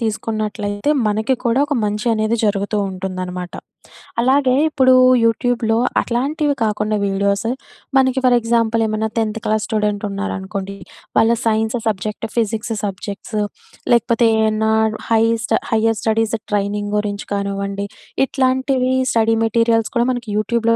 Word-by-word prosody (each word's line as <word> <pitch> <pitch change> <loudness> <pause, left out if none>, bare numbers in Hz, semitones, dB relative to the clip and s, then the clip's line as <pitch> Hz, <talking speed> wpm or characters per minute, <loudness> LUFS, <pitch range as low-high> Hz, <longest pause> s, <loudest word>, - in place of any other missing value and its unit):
తీసుకున్నట్లయితే 215 +1 -2 0.2
మనకి 220 +5 +1
కూడా 235 +3 +2
ఒక 290 - -3
మంచనేది 215 +2 0
జరుగుతూ 205 0 0
ఉంటుందనమాట. 185 -1 -5 0.7
అలాగే 260 0 +3
ఇప్పుడు 260 -4 +4 0.3
యూట్యూబ్‍లో 230 0 +1 0.2
అట్లాంటివి 285 +5 0
కాకుండా 215 0 0
వీడియోసు, 200 +2 0 0.5
మనకి 265 0 +3
ఫర్ 250 -1 +5
ఎగ్జాంపుల్ 230 -1 +1
ఏమన్నా 215 +1 -1
టెన్త్ 225 0 -1
క్లాస్ 215 0 +1
స్టూడెంట్ 210 -1 -1
ఉన్నారనుకోండి. 195 0 -4 0.4
వాళ్ళ 225 +1 +5
సైన్స్ 220 +1 +1
సబ్జెక్ట్, 215 +2 -2
ఫిజిక్స్ 225 0 -1
సబ్జెక్ట్స్ 205 +2 -5 0.6
లేకపోతే, 235 0 +3
ఏమన్నా 220 0 +1 0.4
హై‌స్ట్ 225 0 +2 0.2
హైర్ 225 0 +2
స్టడీస్ 225 0 +1 0.2
ట్రైనింగ్ 205 0 -1
గురించి 205 -1 -3
కానివ్వండి. 200 0 -3 0.4
ఇట్లాంటివి 260 -1 +1 0.2
స్టడీ 225 0 +3
మెటీరియల్స్ 230 0 +2
కూడా 235 0 +3
మనకి 240 -3 -5
యూట్యూబ్‍లో 230 +2 +1
220 Hz, 115 wpm, -19 LUFS, 205-235 Hz, 0.7 s, ఫర్